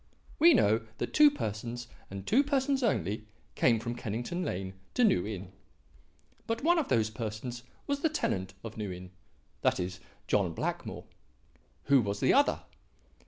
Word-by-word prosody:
"We 335 Hz, -1 st, +8 dB
know 110 Hz, -, +4 dB, 0.2 s
that -, -, -3 dB
two 300 Hz, -1 st, +8 dB
persons, 120 Hz, -, -4 dB, 0.2 s
and 95 Hz, 0 st, -7 dB
two 270 Hz, +5 st, +4 dB
persons 275 Hz, -1 st, +1 dB
only, 110 Hz, -, 0 dB, 0.3 s
came 115 Hz, -3 st, +3 dB
from 115 Hz, +1 st, -3 dB
Kennington 120 Hz, -, -3 dB
Lane 95 Hz, -, -3 dB, 0.2 s
to 250 Hz, -, +3 dB
New 105 Hz, -, +3 dB
Inn. 95 Hz, -3 st, -6 dB, 1.0 s
But 230 Hz, +2 st, -2 dB
one 345 Hz, +2 st, +4 dB
of 300 Hz, -, -1 dB
those 110 Hz, -3 st, +2 dB
persons 110 Hz, +3 st, -5 dB, 0.2 s
was 280 Hz, 0 st, -1 dB
the 320 Hz, -, +2 dB
tenant 95 Hz, -, -2 dB
of 115 Hz, 0 st, -7 dB
New 105 Hz, -3 st, -3 dB
Inn 90 Hz, 0 st, -8 dB, 0.5 s
that -, -, +2 dB
is, 90 Hz, 0 st, -3 dB, 0.3 s
John -, -, +1 dB
Blackmore. -, -, -3 dB, 0.8 s
Who 140 Hz, -2 st, +5 dB
was 100 Hz, -2 st, -2 dB
the -, -, +4 dB
other? 285 Hz, +1 st, +3 dB
115 Hz, 160 wpm, -30 LUFS, -, 1.0 s, We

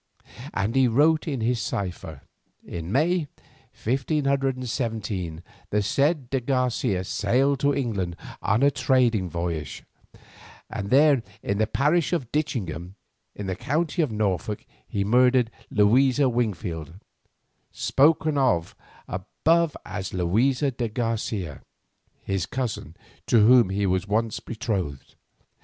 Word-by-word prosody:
And 100 Hz, +3 st, 0 dB
he 135 Hz, -1 st, +5 dB
wrote 155 Hz, +7 st, +3 dB
in 135 Hz, -6 st, -2 dB
his 115 Hz, +1 st, 0 dB
cipher: 90 Hz, -9 st, -4 dB, 0.4 s
"In 85 Hz, +1 st, -6 dB
May, 160 Hz, -, +2 dB, 0.6 s
1517, 125 Hz, -, -1 dB, 0.3 s
the 105 Hz, 0 st, +1 dB
said 140 Hz, -, +1 dB
de 135 Hz, -, +1 dB
Garcia 125 Hz, -6 st, 0 dB
sailed 125 Hz, +8 st, +1 dB
to 145 Hz, 0 st, +2 dB
England 100 Hz, -10 st, -2 dB, 0.3 s
on 110 Hz, +6 st, +2 dB
a 140 Hz, -, +5 dB
trading 125 Hz, -7 st, +2 dB
voyage, 85 Hz, -3 st, -4 dB, 0.9 s
and 100 Hz, 0 st, -4 dB
there, 140 Hz, 0 st, +5 dB, 0.2 s
in 100 Hz, +1 st, -1 dB
the 110 Hz, -, +2 dB
parish 150 Hz, +8 st, +1 dB
of 135 Hz, -9 st, -2 dB
Ditchingham, 95 Hz, -, -3 dB, 0.4 s
in 105 Hz, -, -6 dB
the 95 Hz, -1 st, -2 dB
county 160 Hz, -, -1 dB
of 150 Hz, -7 st, 0 dB
Norfolk, 105 Hz, -1 st, -2 dB, 0.2 s
he 100 Hz, -, -1 dB
murdered 125 Hz, +2 st, +3 dB, 0.2 s
Luisa 130 Hz, +6 st, +4 dB
Wingfield, 90 Hz, -, -2 dB, 0.8 s
spoken 155 Hz, +1 st, +2 dB
of 105 Hz, -12 st, +1 dB, 0.3 s
above 160 Hz, -, 0 dB
as 100 Hz, -2 st, -5 dB
Luisa 125 Hz, -, +2 dB
de 120 Hz, -2 st, -3 dB
Garcia, 110 Hz, -, -3 dB, 0.6 s
his 95 Hz, -1 st, -2 dB
cousin, 110 Hz, -, -4 dB, 0.3 s
to 110 Hz, -3 st, +5 dB
whom 120 Hz, -4 st, +6 dB
he 100 Hz, +1 st, 0 dB
was 95 Hz, +1 st, 0 dB
once 110 Hz, +2 st, 0 dB
betrothed. 100 Hz, -, -4 dB
115 Hz, 120 wpm, -25 LUFS, 95-135 Hz, 0.9 s, whom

